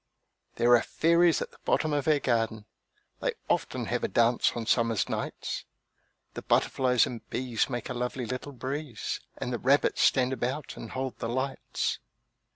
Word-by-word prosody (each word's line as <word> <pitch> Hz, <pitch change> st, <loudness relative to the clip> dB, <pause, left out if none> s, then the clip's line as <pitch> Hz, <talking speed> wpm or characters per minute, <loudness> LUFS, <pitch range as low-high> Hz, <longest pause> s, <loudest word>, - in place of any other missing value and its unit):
There 120 Hz, +1 st, +5 dB
are 120 Hz, -, +4 dB
fairies 170 Hz, +1 st, +3 dB
at -, -, -10 dB
the -, -, -20 dB
bottom 155 Hz, -1 st, +1 dB
of 145 Hz, 0 st, 0 dB
our 155 Hz, -1 st, +5 dB
garden! 115 Hz, -5 st, 0 dB, 0.5 s
They -, -, 0 dB
often -, -, 0 dB
have -, -, -2 dB
a -, -, +2 dB
dance 120 Hz, +1 st, +3 dB
on 115 Hz, -1 st, -3 dB
summer 115 Hz, 0 st, +2 dB
nights; -, -, -4 dB, 0.7 s
The -, -, -6 dB
butterflies 125 Hz, -3 st, +3 dB
and 120 Hz, -3 st, -8 dB
bees 125 Hz, -2 st, -1 dB
make 120 Hz, -2 st, -3 dB
a 125 Hz, -, -3 dB
lovely 125 Hz, +1 st, -3 dB
little 130 Hz, +5 st, -5 dB
breeze, 130 Hz, -1 st, -4 dB, 0.2 s
And 125 Hz, -, -3 dB
the 120 Hz, -, -2 dB
rabbits 140 Hz, +3 st, +3 dB
stand 130 Hz, -1 st, +4 dB
about 130 Hz, +3 st, -3 dB
and 115 Hz, -, -8 dB
hold 130 Hz, -1 st, -3 dB
the 115 Hz, -, -3 dB
lights. 130 Hz, +3 st, -2 dB
125 Hz, 165 wpm, -28 LUFS, 120-135 Hz, 0.7 s, There